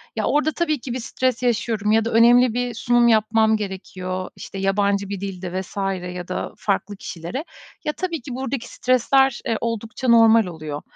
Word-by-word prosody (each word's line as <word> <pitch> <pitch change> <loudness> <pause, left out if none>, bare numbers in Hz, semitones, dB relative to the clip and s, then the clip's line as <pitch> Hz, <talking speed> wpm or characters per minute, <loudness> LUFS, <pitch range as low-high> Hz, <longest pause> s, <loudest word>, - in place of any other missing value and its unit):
Ya, - - -1
orada 300 +1 +2
tabii 310 -3 -1
ki 245 0 -6
bir 255 - -3
stres 255 +1 -1
yaşıyorum 220 -3 0
ya 220 0 +3
da 230 - -2
önemli 240 +1 +5
bir 245 0 -2
sunum 240 +1 +3
yapmam 220 0 +3
gerekiyor, 185 -2 -5
işte, - - -9
yabancı 200 0 +1
bir 200 -1 -4
dilde 185 -2 -4
vs. 190 - -12 0.4
ya 180 -1 -6
da 185 - -4
farklı 205 0 -1
kişilere. 190 - -6 0.4
Ya, 300 - 0
tabii 340 -2 -3
ki 245 0 -7
buradaki 265 -1 -3
stresler, 255 +1 +2
eee, 230 -4 0
oldukça 230 +2 -3
normal 225 -2 +6
oluyor. 155 -4 -6
225 Hz, 175 wpm, -22 LUFS, 195-245 Hz, 0.4 s, normal